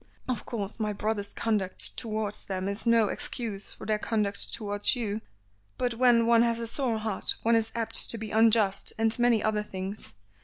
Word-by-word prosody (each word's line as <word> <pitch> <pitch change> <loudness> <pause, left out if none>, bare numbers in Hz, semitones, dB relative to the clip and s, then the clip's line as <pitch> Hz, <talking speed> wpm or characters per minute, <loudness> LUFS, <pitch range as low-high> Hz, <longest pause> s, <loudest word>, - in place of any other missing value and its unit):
Of 255 -2 -3
course 215 -1 -5
my 210 -1 -1
brother's 205 0 -3
conduct 205 -5 +2
towards 215 -2 -4
them 190 -1 -3
is 200 +4 -3
no 230 -2 +4
excuse 210 -2 -3
for - - -10
their 215 -1 0
conduct 210 -2 -1
towards 205 +1 -1
you, 220 -3 -3 0.6
but 245 -1 -1
when 235 -1 +4
one 230 0 +5
has 235 -1 +1
a 230 - -3
sore 235 -1 0
heart 215 -2 0
one 230 +1 +3
is 225 0 +1
apt 230 -1 +2
to 230 - +2
be 220 -1 -6
unjust, 220 -3 +3
and 225 +1 0
many 240 -2 +3
other 215 -1 +1
things. 190 - -7
220 Hz, 185 wpm, -28 LUFS, 205-230 Hz, 0.6 s, one